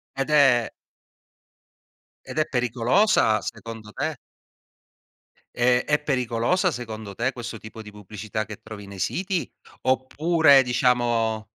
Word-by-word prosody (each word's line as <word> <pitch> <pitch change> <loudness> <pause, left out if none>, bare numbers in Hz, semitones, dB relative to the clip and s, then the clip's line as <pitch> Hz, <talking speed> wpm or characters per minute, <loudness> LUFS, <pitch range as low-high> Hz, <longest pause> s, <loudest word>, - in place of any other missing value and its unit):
Ed 135 +2 -2
è 135 -6 +4 1.6
ed - - -6
è 155 - +2
pericolosa, 125 - +2
secondo 115 -1 -8
te? - - -3 1.4
Eh, 125 0 +2
è 150 0 +2
pericolosa 130 - +1
secondo 110 -6 -7
te 125 +6 -1
questo 120 -2 -7
tipo 110 +1 -11
di 105 - -11
pubblicità 105 +1 -6
che 105 -1 -10
trovi 105 -2 -10
nei 100 -1 -10
siti? 185 - -2 0.3
Oppure 140 +2 +4
diciamo 120 -3 +1
120 Hz, 115 wpm, -24 LUFS, 110-135 Hz, 1.6 s, è